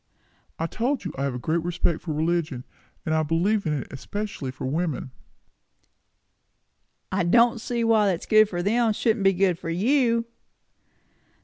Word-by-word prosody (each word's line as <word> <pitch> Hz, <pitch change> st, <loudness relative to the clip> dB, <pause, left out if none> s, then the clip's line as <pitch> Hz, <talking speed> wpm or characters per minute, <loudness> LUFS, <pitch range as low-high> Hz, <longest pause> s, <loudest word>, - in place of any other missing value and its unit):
"I 165 Hz, -, -2 dB
told 240 Hz, +7 st, -2 dB
you, 165 Hz, -, -4 dB
I 135 Hz, -, -2 dB
have 135 Hz, -3 st, -2 dB
a -, -, -2 dB
great 160 Hz, +7 st, -1 dB
respect 170 Hz, -1 st, -1 dB
for 165 Hz, -, -5 dB
religion; 155 Hz, -4 st, -1 dB, 0.4 s
and 160 Hz, -, 0 dB
I 160 Hz, -, +2 dB
believe 175 Hz, +6 st, +1 dB
in 155 Hz, -, +1 dB
it 140 Hz, -, -3 dB
especially 200 Hz, +1 st, -5 dB
for 130 Hz, -, -6 dB
women." 150 Hz, -1 st, -2 dB, 2.0 s
"I 190 Hz, 0 st, +1 dB
don't 235 Hz, +5 st, +4 dB
see 240 Hz, 0 st, -2 dB
why 220 Hz, -3 st, +4 dB
what's 175 Hz, -, -4 dB
good 215 Hz, -1 st, +5 dB
for 175 Hz, -2 st, -3 dB
them 225 Hz, +2 st, +2 dB
shouldn't 215 Hz, -1 st, 0 dB
be 195 Hz, 0 st, +5 dB
good 180 Hz, -2 st, +1 dB
for 165 Hz, -, -6 dB
you." 230 Hz, +5 st, +2 dB
180 Hz, 165 wpm, -25 LUFS, 160-220 Hz, 2.0 s, good